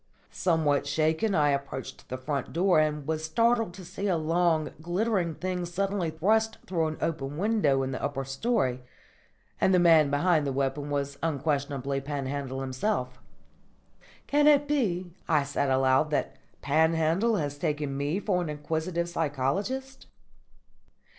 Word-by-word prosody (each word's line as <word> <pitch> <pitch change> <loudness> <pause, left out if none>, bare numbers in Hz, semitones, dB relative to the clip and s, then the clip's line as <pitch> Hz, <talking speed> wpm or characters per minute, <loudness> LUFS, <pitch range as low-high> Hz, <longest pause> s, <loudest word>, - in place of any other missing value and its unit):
_" - - -24
Somewhat 155 -5 +1
shaken 160 +7 +1
I 145 -2 +3
approached 140 -2 -5
the 130 - -3
front 140 +2 -3
door 180 0 +3
and 150 -2 0
was 155 +1 -2
startled 230 +5 +2
to 185 - -10
see 190 +3 -4
a 180 -3 +2
long, 160 -1 +1
glittering 175 -1 0
thing 180 +1 -3
suddenly 190 0 -1
thrust 220 +8 +1
through 165 -4 0
an 155 - -4
open 145 -3 -2
window 180 -9 +2
in 130 - -3
the 130 - -4
upper 135 -1 -2
storey; 135 - 0 0.8
and 190 - +4
the - - +5
man 165 -4 +6
behind 150 +1 +2
the - - 0
weapon 135 +2 -2
was 140 -1 -2
unquestionably 140 -3 -1
Panhandle 135 -1 -4
himself. 130 -1 -2 1.1
"Can 295 +1 +3
it 290 -1 +5
be," 190 -12 0 0.2
I 150 -4 +3
said 140 0 -1
aloud, 130 +3 +3
"that 150 - -1 0.3
Panhandle 160 +8 +2
has 145 -5 -3
taken 145 -2 -2
me 145 +6 -1
for 190 -4 0
an 170 - -3
inquisitive 160 +3 -2
psychologist?" 180 - -2
155 Hz, 145 wpm, -28 LUFS, 140-185 Hz, 1.1 s, man